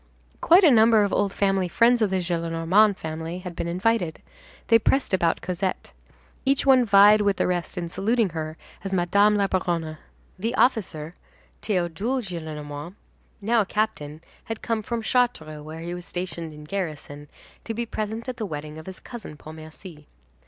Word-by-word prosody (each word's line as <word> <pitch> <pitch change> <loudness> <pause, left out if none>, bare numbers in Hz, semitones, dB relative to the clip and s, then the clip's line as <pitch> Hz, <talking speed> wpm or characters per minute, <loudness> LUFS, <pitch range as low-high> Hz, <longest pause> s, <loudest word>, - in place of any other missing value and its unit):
Quite 360 +4 +6
a 315 - +7
number 225 -2 +6
of 200 - -1
old 200 -1 +1
family 195 -2 +1
friends 235 +6 +3
of 215 - +3
the 190 -1 0
Gillenormand 170 +4 +2
family 160 +2 -5
had 180 -1 -8
been 170 - -3
invited; 180 -1 0 0.5
they 230 -1 +6
pressed 270 0 +1
about 170 -3 +1
Cosette. 185 +1 -3 0.5
Each 275 +1 +1
one 260 -2 +6
vied 205 0 +7
with 200 -2 +1
the - - +1
rest 180 +1 -2
in 170 -1 -2
saluting 210 +5 0
her 155 -1 -5 0.3
as 195 -1 -2
Madame 200 +4 +3
la 200 -1 +2
Baronne. 170 -5 -2 0.4
The 230 +5 -2
officer, 175 - +1 0.5
Théodule 200 +6 -1
Gillenormand, 155 -2 -7 0.5
now 225 +3 +2
a - - -1
captain, 160 -9 -2 0.2
had 225 -1 -6
come 225 -2 -1
from 230 +1 -4
Chartres, 220 - 0
where 155 +2 -8
he 170 +1 -5
was 175 0 -7
stationed 170 -2 -5
in 150 0 -11
garrison, 150 -4 -5 0.4
to 225 - -5
be 235 +1 -2
present 220 +2 -4
at 255 -1 -4
the 220 - -3
wedding 150 -1 -7
of 160 - -12
his 190 0 -7
cousin 220 -11 -9
Pontmercy. 155 +1 -11
185 Hz, 170 wpm, -24 LUFS, 165-220 Hz, 0.5 s, a